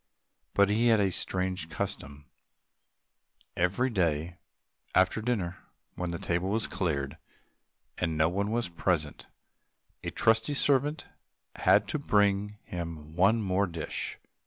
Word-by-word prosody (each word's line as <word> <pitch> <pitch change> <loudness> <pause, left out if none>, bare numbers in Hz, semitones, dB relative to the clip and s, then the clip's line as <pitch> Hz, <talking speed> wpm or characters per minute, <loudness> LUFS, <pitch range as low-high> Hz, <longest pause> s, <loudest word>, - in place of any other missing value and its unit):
But 100 0 +5
he 115 +3 +3
had 115 -2 +5
a 100 -2 +2
strange 90 -2 -1
custom; 70 -2 -5 1.3
every 95 +9 +1
day 85 -3 0 0.6
after 95 +4 +3
dinner, 100 -7 -1 0.3
when 90 -1 -3
the 85 - -3
table 85 +3 -1
was 110 +2 0
cleared, 70 -7 -2 0.8
and 80 -3 0
no 80 +1 +4
one 100 +4 -1
else 110 - -2
was 120 -5 0
present, 85 -3 -1 0.8
a - - -2
trusty 115 +5 +2
servant 145 +2 +2 0.5
had - - +4
to 155 - -1
bring 105 -4 +2
him 80 -3 -6
one 105 +5 +4
more 95 +1 +1
dish. 80 -3 -4
95 Hz, 130 wpm, -29 LUFS, 85-110 Hz, 1.3 s, But